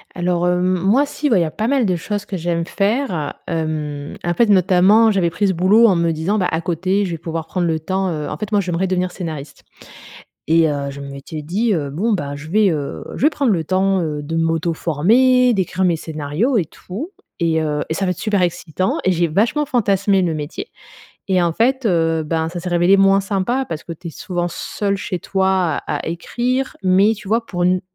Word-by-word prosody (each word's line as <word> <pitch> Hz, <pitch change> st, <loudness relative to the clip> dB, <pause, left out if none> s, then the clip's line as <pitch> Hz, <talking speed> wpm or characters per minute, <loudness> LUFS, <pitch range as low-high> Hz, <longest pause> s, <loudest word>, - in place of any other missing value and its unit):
Alors, 175 Hz, -1 st, 0 dB
heu, 180 Hz, -, +3 dB
m 185 Hz, 0 st, +1 dB
moi, 215 Hz, +11 st, +3 dB
si, 290 Hz, 0 st, -2 dB
bah, 220 Hz, -, +4 dB
il -, -, +3 dB
y -, -, +3 dB
a 155 Hz, -, -3 dB
pas 220 Hz, +2 st, -2 dB
mal 270 Hz, -4 st, +2 dB
de 185 Hz, -2 st, +1 dB
choses 205 Hz, +4 st, -4 dB
que 190 Hz, -, -4 dB
j'aime 170 Hz, 0 st, -1 dB
faire, 215 Hz, +8 st, 0 dB, 0.4 s
heu. -, -, -4 dB
Hem, 150 Hz, -3 st, -3 dB
en 175 Hz, -, 0 dB
fait, 225 Hz, +4 st, +2 dB
notamment, 195 Hz, +4 st, +5 dB
j'avais 185 Hz, -4 st, +1 dB
pris 205 Hz, +4 st, 0 dB
ce -, -, +1 dB
boulot 195 Hz, +7 st, +5 dB
en 195 Hz, -5 st, +5 dB
me 170 Hz, 0 st, +1 dB
disant, 165 Hz, +7 st, -1 dB
bah, 185 Hz, -, +1 dB
à 160 Hz, -, -1 dB
côté 185 Hz, +4 st, 0 dB
je 180 Hz, -, -4 dB
vais 165 Hz, -, -3 dB
pouvoir 165 Hz, 0 st, -5 dB
prendre 175 Hz, -1 st, -1 dB
le 160 Hz, -1 st, 0 dB
temps, 190 Hz, +3 st, -1 dB
heu 150 Hz, -3 st, -3 dB
en 150 Hz, -, -5 dB
fait, 215 Hz, 0 st, -5 dB
moi, 205 Hz, -, +3 dB
j'aimerais 180 Hz, 0 st, -1 dB
devenir 185 Hz, 0 st, -1 dB
scénariste 155 Hz, -6 st, -7 dB, 0.9 s
et 165 Hz, 0 st, +4 dB
heu, 140 Hz, -1 st, -2 dB
je 140 Hz, -, -9 dB
m'étais 140 Hz, +2 st, -7 dB
dit: 210 Hz, +9 st, 0 dB
«Heu, 145 Hz, -4 st, -2 dB
bon, 210 Hz, +10 st, -1 dB
bah, 145 Hz, -7 st, -2 dB
je 150 Hz, +2 st, -9 dB
vais, 205 Hz, +1 st, +3 dB
heu, 145 Hz, -3 st, -4 dB
je -, -, -6 dB
vais 300 Hz, -, +5 dB
prendre 280 Hz, -7 st, +1 dB
le 170 Hz, -4 st, 0 dB
temps, 190 Hz, +2 st, +1 dB
heu, 150 Hz, -2 st, -3 dB
de 160 Hz, +3 st, -5 dB
m'auto-former, 170 Hz, -, +2 dB
d'écrire 190 Hz, 0 st, -1 dB
mes 170 Hz, -2 st, +2 dB
scénarios 160 Hz, -, -2 dB
et 185 Hz, -, +2 dB
tout 225 Hz, -, -8 dB, 0.3 s
et 160 Hz, -1 st, +2 dB
heu, 150 Hz, -1 st, -1 dB
et 160 Hz, -, -2 dB
ça 195 Hz, -, -1 dB
va 180 Hz, -, 0 dB
être 180 Hz, -, -3 dB
super 205 Hz, -3 st, 0 dB
excitant» 175 Hz, +1 st, -1 dB
et 185 Hz, -, +3 dB
j'ai 170 Hz, 0 st, +1 dB
vachement 225 Hz, -, +1 dB
fantasmé 200 Hz, -6 st, +2 dB
le 170 Hz, -3 st, 0 dB
métier 155 Hz, -, -5 dB, 0.6 s
et 185 Hz, -2 st, +3 dB
en 170 Hz, -1 st, +1 dB
fait, 260 Hz, +7 st, +1 dB
heu, 165 Hz, -4 st, +1 dB
ben, 160 Hz, +1 st, -1 dB
ça 175 Hz, -, -6 dB
s'est 180 Hz, -, -5 dB
révélé 175 Hz, +3 st, +4 dB
moins 195 Hz, 0 st, +4 dB
sympa, 200 Hz, +7 st, -1 dB
parce 160 Hz, -1 st, -5 dB
que 170 Hz, -, -6 dB
tu 170 Hz, +1 st, -9 dB
es -, -, -6 dB
souvent 175 Hz, -1 st, -3 dB
seule 200 Hz, +3 st, -3 dB
chez 190 Hz, -2 st, -4 dB
toi 190 Hz, +2 st, 0 dB, 0.4 s
à 150 Hz, -, -1 dB
à -, -, -7 dB
écrire. 245 Hz, +10 st, -2 dB
Mais, 190 Hz, +3 st, +4 dB
tu 210 Hz, -1 st, -11 dB
vois, 230 Hz, +2 st, +1 dB
pour 175 Hz, -2 st, -2 dB
n 180 Hz, 0 st, +2 dB
180 Hz, 230 wpm, -19 LUFS, 165-205 Hz, 0.9 s, notamment